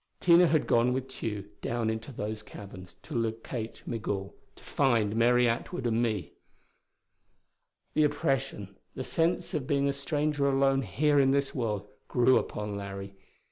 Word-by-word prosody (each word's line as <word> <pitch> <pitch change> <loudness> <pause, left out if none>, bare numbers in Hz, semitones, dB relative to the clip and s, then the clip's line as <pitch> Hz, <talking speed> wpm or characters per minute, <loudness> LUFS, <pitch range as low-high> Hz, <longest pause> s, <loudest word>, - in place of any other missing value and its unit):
Tina 175 0 +6
had 155 -2 +2
gone 120 +1 +3
with 130 0 -2
Tugh 105 -6 -5 0.2
down 115 -2 -1
into 110 +4 -5
those 110 -2 -4
caverns, 95 -4 -11
to - - -9
locate 115 0 -3
Migul, 105 -4 -3 0.2
to - - -17
find 115 -7 +1
Mary 120 +1 +4
Atwood 120 +7 -2
and 115 0 +2
me.... 105 -10 -1 1.6
The 155 - +4
oppression, 135 -9 -1 0.2
the 130 - -3
sense 170 +5 0
of 145 -5 -2
being 140 -1 +2
a 140 - +1
stranger 145 0 0
alone 135 0 +3
here 140 - +2
in 135 -1 +4
this 140 0 +1
world, 105 -5 -2 0.2
grew 125 +1 +4
upon 105 -1 -4
Larry. 100 0 -6
120 Hz, 150 wpm, -29 LUFS, 105-140 Hz, 1.6 s, Tina